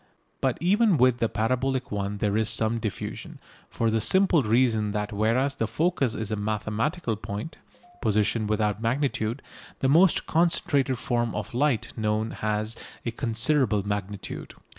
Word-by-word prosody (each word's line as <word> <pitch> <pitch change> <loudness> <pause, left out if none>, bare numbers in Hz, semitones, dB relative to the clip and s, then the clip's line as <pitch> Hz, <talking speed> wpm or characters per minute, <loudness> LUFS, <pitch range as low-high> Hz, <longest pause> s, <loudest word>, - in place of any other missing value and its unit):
But 130 -2 +1
even 200 +1 +3
with 125 -1 +4
the 115 - +1
parabolic 130 +3 -1
one 100 0 -2
there 100 0 0
is 110 0 +2
some 115 +1 +1
diffusion, 110 -3 -5 0.3
for 115 -1 0
the 110 0 +1
simple 190 - +4
reason 110 -2 +2
that 105 0 -3
whereas 115 +7 +1
the 115 -5 -2
focus 155 - 0
is 110 -1 -4
a - - +1
mathematical 110 - -2
point 105 +9 -6 0.4
(position 105 0 +1
without 105 -1 0
magnitude) 120 -1 -1 0.4
the 130 - +1
most 170 +5 +4
concentrated 145 -6 +1
form 120 -1 -1
of 105 +4 -5
light 130 -2 0
known 110 0 -1
has 110 +1 -2 0.3
a 115 - -1
considerable 115 -2 +1
magnitude. 100 -1 -5
115 Hz, 145 wpm, -26 LUFS, 105-135 Hz, 0.4 s, with